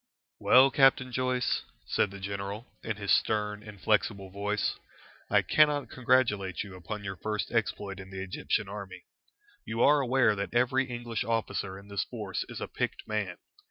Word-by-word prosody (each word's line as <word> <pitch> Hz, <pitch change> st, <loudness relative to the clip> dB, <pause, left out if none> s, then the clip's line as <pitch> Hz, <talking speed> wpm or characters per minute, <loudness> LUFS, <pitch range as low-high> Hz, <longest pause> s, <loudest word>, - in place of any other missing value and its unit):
"Well, 130 Hz, +2 st, +6 dB
Captain 130 Hz, -1 st, +4 dB
Joyce," 130 Hz, 0 st, 0 dB, 0.2 s
said -, -, +1 dB
the 100 Hz, 0 st, -9 dB
general, 100 Hz, +3 st, -4 dB, 0.2 s
in 110 Hz, -, -3 dB
his 100 Hz, -1 st, -2 dB
stern, 105 Hz, -1 st, +1 dB
inflexible 100 Hz, -1 st, -1 dB
voice, 105 Hz, +2 st, -1 dB, 0.5 s
"I -, -, +4 dB
cannot 150 Hz, -2 st, +3 dB
congratulate 115 Hz, -8 st, +1 dB
you 100 Hz, -2 st, -10 dB
upon 95 Hz, +4 st, -6 dB
your 95 Hz, -1 st, -4 dB
first 105 Hz, +1 st, -3 dB
exploit 105 Hz, -3 st, -1 dB
in 95 Hz, 0 st, -9 dB
the 95 Hz, 0 st, -5 dB
Egyptian 95 Hz, +2 st, -1 dB
army. 95 Hz, -3 st, -8 dB, 0.6 s
You 115 Hz, +2 st, -1 dB
are 145 Hz, +1 st, +6 dB
aware 125 Hz, -4 st, +3 dB
that 100 Hz, +3 st, -4 dB
every 130 Hz, +2 st, +3 dB
English 120 Hz, -3 st, -3 dB
officer 110 Hz, -4 st, -2 dB
in 100 Hz, +1 st, -13 dB
this 100 Hz, -1 st, -1 dB
force 105 Hz, -6 st, -4 dB
is -, -, -6 dB
a -, -, -4 dB
picked -, -, -3 dB
man. 105 Hz, -4 st, -2 dB
105 Hz, 160 wpm, -29 LUFS, 100-120 Hz, 0.6 s, Well